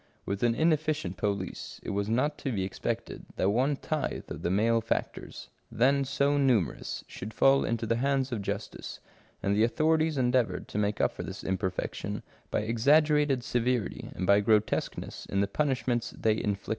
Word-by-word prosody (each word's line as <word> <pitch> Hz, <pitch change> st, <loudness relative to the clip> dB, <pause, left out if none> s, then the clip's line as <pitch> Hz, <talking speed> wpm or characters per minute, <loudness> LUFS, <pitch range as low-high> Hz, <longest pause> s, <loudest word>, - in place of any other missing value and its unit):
With 100 Hz, 0 st, -3 dB
an 120 Hz, -1 st, +3 dB
inefficient 155 Hz, -, +1 dB
police, 100 Hz, -3 st, -3 dB
it -, -, -4 dB
was 100 Hz, +1 st, -1 dB
not 135 Hz, +6 st, +1 dB
to 135 Hz, -, -2 dB
be 100 Hz, -5 st, -1 dB
expected 95 Hz, 0 st, -4 dB
that 95 Hz, -, +2 dB
one 130 Hz, +6 st, +2 dB
tithe 155 Hz, +2 st, -3 dB
of -, -, -5 dB
the -, -, -1 dB
male 115 Hz, +4 st, +3 dB
factors, 110 Hz, -, -4 dB, 0.2 s
then 135 Hz, +4 st, +3 dB
so 140 Hz, +2 st, +1 dB
numerous, 120 Hz, -, +1 dB
should 105 Hz, +3 st, -8 dB
fall 135 Hz, 0 st, +5 dB
into 115 Hz, 0 st, -1 dB
the 115 Hz, +1 st, +1 dB
hands 135 Hz, +1 st, +1 dB
of 115 Hz, -4 st, -2 dB
justice, 100 Hz, +2 st, -5 dB, 0.4 s
and 100 Hz, +1 st, +2 dB
the 110 Hz, -, +4 dB
authorities 155 Hz, +5 st, +2 dB
endeavoured 125 Hz, -2 st, +1 dB
to 105 Hz, -, -2 dB
make 105 Hz, 0 st, 0 dB
up -, -, +3 dB
for -, -, -7 dB
this -, -, -7 dB
imperfection 95 Hz, -1 st, -3 dB, 0.3 s
by -, -, 0 dB
exaggerated 140 Hz, +4 st, +3 dB
severity, 120 Hz, -3 st, -1 dB
and 90 Hz, -, -2 dB
by 100 Hz, +2 st, +5 dB
grotesqueness 105 Hz, 0 st, 0 dB
in 100 Hz, -, -1 dB
the 100 Hz, -, +2 dB
punishments 125 Hz, -1 st, -1 dB
they 110 Hz, -, +3 dB
inflicted. 100 Hz, -1 st, -2 dB
115 Hz, 170 wpm, -29 LUFS, 100-140 Hz, 0.4 s, fall